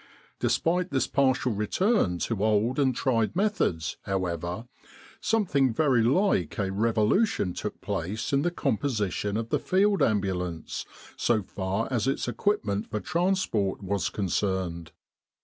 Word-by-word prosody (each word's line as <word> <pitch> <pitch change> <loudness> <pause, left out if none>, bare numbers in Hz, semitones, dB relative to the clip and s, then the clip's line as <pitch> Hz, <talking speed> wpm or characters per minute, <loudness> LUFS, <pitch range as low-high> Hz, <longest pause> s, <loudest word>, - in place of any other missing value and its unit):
Despite 180 +2 +1
this 135 -2 +1
partial 130 -2 +2
return 105 - +1
to 110 -3 -2
old 110 +5 +2
and 130 -3 +2
tried 115 0 +1
methods, 180 - 0
however, 90 +2 -2 0.5
something 175 - +2
very 130 -1 +3
like 120 - +2
a 95 -2 -1
revolution 110 - +1
took - - -5
place 100 - -3
in 140 - +4
the 175 - +1
composition 105 - -1
of 115 0 -3
the - - +1
Field 200 +2 +2
Ambulance, 90 -5 -1 0.3
so 110 -4 +1
far 95 +4 -2
as 120 -1 0
its 135 - 0
equipment 120 - -1
for 105 - -2
transport 170 - 0
was 95 -2 -1
concerned. 95 -4 -2
110 Hz, 130 wpm, -27 LUFS, 95-140 Hz, 0.5 s, in